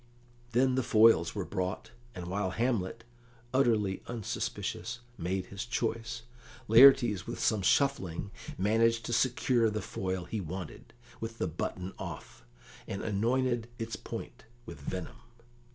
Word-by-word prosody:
Then 130 +2 +4
the 130 - +2
foils 110 -7 +5
were 100 -3 -2
brought, 90 +1 -3 0.2
and 90 - -6
while 95 +2 -1
Hamlet, 115 0 -1 0.5
utterly 110 -7 +2
unsuspicious, 120 +1 -4
made 90 0 -2
his 100 +4 -6
choice, 115 0 -2 0.4
Laertes, 120 -4 +7
with - - -5
some 110 -3 +2
shuffling, 100 - +1 0.3
managed 115 +3 +2
to 120 - -2
secure 120 -1 +3
the 105 0 -2
foil 95 -2 -3
he 105 +4 -3
wanted, 90 0 -7 0.3
with 115 0 -5
the - - 0
button 90 +3 -4
off, - - -8 0.4
and 95 - -4
anointed 120 +3 +1
its 115 -1 -4
point - - -8 0.2
with 70 - -9
venom. 90 +4 -5
110 Hz, 130 wpm, -31 LUFS, 95-120 Hz, 0.5 s, Laertes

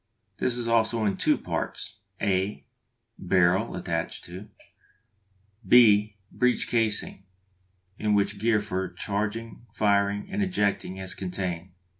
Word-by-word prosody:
This 125 -1 0
is 120 -1 -2
also 115 -1 +2
in 100 - +1
two - - +2
parts: 105 +1 -4 0.2
(a) 95 0 -1 0.5
barrel, 95 +4 +2
attached 85 -2 -3
to 90 +4 -9 1.1
(b) 105 -4 +5
breech 125 0 +1
casing, 110 -4 0 0.8
in 105 -1 +2
which 100 0 0
gear 110 -1 +2
for 95 -2 -3
charging, 105 +5 -4
firing, 100 -1 +1
and 200 +1 -1
ejecting 105 - 0
is 95 -1 -4
contained. 90 -1 -4
105 Hz, 115 wpm, -26 LUFS, 95-115 Hz, 1.1 s, b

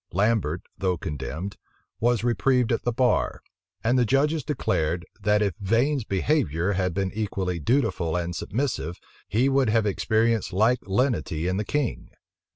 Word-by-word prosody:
Lambert, 100 -4 +1 0.2
though 90 -2 +1
condemned, 80 +6 -5 0.4
was 120 -1 +2
reprieved 120 +1 +2
at 115 - +1
the 120 - 0
bar; 125 0 +1 0.4
and 120 +3 +3
the - - +4
judges 145 +6 +2
declared, 85 - -1 0.2
that 105 +1 +3
if 100 -3 0
Vane's 120 +6 +1
behavior 95 - +1
had 90 -2 -1
been 95 -1 -1
equally 95 -5 -2
dutiful 95 - +1
and 85 -1 -2
submissive, 100 - -2 0.3
he 120 +6 +2
would 135 -3 +3
have 110 0 +2
experienced 110 +1 +1
like 110 +6 +3
lenity 95 - 0
in 95 +1 0
the 105 - 0
king. 145 +1 -2
105 Hz, 150 wpm, -25 LUFS, 90-125 Hz, 0.4 s, the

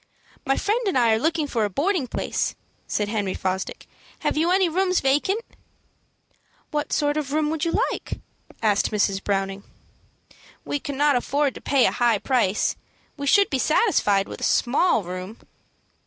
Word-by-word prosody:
"My 270 - +2
friend 430 +4 0
and 375 - +1
I 235 -3 +4
are 220 - +2
looking 315 +3 0
for 235 -6 -1
a 205 - 0
boarding 295 - 0
place," - - -2 0.3
said 210 - -1
Henry 205 -3 -2
Fosdick. 190 0 -3 0.4
"Have - - 0
you 320 +3 +2
any 375 0 +3
rooms 365 +2 +1
vacant?" 295 +11 +1 1.3
"What 295 -1 -2
sort 290 0 +1
of 285 -2 -3
a - - -1
room 305 -1 +1
would 320 0 -1
you 335 - +1
like?" - - -5 0.5
asked 205 -2 +2
Mrs. 200 -2 0
Browning. 195 0 -2 1.0
"We 290 - -2
cannot 285 -1 +1
afford 280 +2 0
to - - -10
pay 275 -3 +3
a - - +3
high 240 -3 +2
price. 215 -2 +1 0.4
We 285 -1 -5
should 400 +6 +4
be 270 - 0
satisfied 210 - +2
with - - -9
a - - -4
small 250 - +2
room." 185 +5 -7
270 Hz, 170 wpm, -24 LUFS, 210-315 Hz, 1.3 s, I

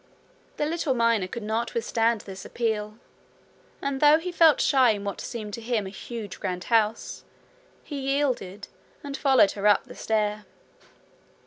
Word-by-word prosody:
The 295 - 0
little 310 -3 -1
miner 230 -5 +2
could 230 +4 -6
not 220 +2 -2
withstand 230 -1 +1
this 190 -1 -9
appeal, 215 -2 -2 0.9
and 275 -1 -2
though 300 +1 +7
he 355 +3 -5
felt 330 -3 +5
shy 260 -4 +4
in 205 -1 -6
what 200 -2 -4
seemed 215 -3 -6
to 230 - -5
him 225 -3 -1
a 190 - -7
huge 215 0 -7
grand 180 -1 -3
house, 220 0 +1 0.6
he 290 -2 -6
yielded, 265 -8 -1 0.4
and 280 -1 -5
followed 265 -8 +4
her 205 0 -1
up 205 - +4
the - - -12
stair. 210 -1 -1
230 Hz, 155 wpm, -26 LUFS, 210-270 Hz, 0.9 s, though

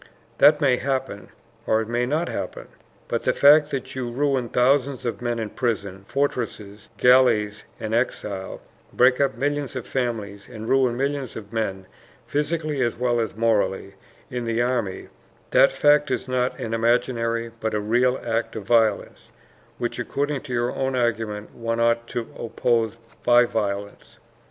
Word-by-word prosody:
That 150 0 +7
may 135 -5 +3
happen 135 -6 -3 0.4
or 110 - +3
it 110 - -3
may 120 +1 0
not 155 +6 0
happen. - - -5 0.4
But - - -1
the - - +2
fact 150 +1 +6
that 135 -3 -4
you 130 -2 -3
ruin 130 -1 0
thousands 130 +1 +2
of 120 - -3
men 120 -1 -1
in 110 -2 -4
prisons, 100 -5 -3
fortresses, 115 -7 -3
galleys, 115 -5 +4
and 110 0 -4
exile, 105 -5 -2 0.3
break 125 +2 +4
up 135 -3 +1
millions 145 +1 -2
of 130 - -4
families 110 -6 -3
and 110 0 -7
ruin 130 -2 +2
millions 140 -2 -2
of 105 0 -9
men, 95 -4 -2 0.4
physically 150 -1 -1
as 120 -2 0
well 120 0 0
as 110 -4 -2
morally, 105 -3 0 0.4
in 125 -1 -3
the 115 0 -1
army, 120 -6 -1 0.4
that - - +6
fact 150 0 +3
is - - -2
not 125 0 0
an 115 -4 -4
imaginary 115 0 0
but 110 -1 -2
a - - +1
real 120 +5 +1
act 115 0 -1
of 110 - -5
violence, 110 -1 +1 0.5
which, 120 +1 -3
according 140 +3 -2
to 140 - -10
your 120 0 0
own 135 -1 -1
argument, 110 -4 -2
one 115 0 -3
ought 115 0 +2
to 120 - -3 0.2
oppose 115 -1 0 0.3
by 120 0 +6
violence. 100 -3 -4
120 Hz, 160 wpm, -23 LUFS, 110-130 Hz, 0.5 s, That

